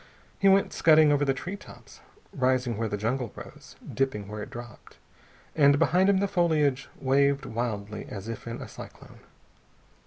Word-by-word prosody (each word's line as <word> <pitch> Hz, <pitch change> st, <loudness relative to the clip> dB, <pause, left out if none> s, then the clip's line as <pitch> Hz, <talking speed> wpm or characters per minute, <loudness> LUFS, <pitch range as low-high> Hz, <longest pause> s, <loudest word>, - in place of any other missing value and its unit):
He 195 Hz, -, +5 dB
went 195 Hz, 0 st, +3 dB
scudding 155 Hz, -2 st, +5 dB
over 145 Hz, 0 st, +2 dB
the 135 Hz, -, +2 dB
tree 180 Hz, +8 st, -5 dB
tops, 120 Hz, -, -15 dB, 0.3 s
rising 130 Hz, -2 st, 0 dB
where 110 Hz, +1 st, -2 dB
the 105 Hz, -, -2 dB
jungle 115 Hz, +3 st, -2 dB
rose, -, -, -12 dB
dipping 130 Hz, -7 st, -2 dB
where 105 Hz, +1 st, -6 dB
it 105 Hz, -, -7 dB
dropped, 120 Hz, -3 st, -11 dB, 0.6 s
and 145 Hz, -2 st, +5 dB
behind 185 Hz, +6 st, +3 dB
him 200 Hz, -, +4 dB
the 200 Hz, +1 st, +1 dB
foliage 155 Hz, -8 st, +1 dB
waved 140 Hz, +1 st, +2 dB
wildly 110 Hz, -3 st, -4 dB
as 100 Hz, 0 st, -7 dB
if 115 Hz, 0 st, -7 dB
in 115 Hz, +1 st, -6 dB
a -, -, -9 dB
cyclone. -, -, -12 dB
130 Hz, 165 wpm, -27 LUFS, 115-150 Hz, 0.6 s, He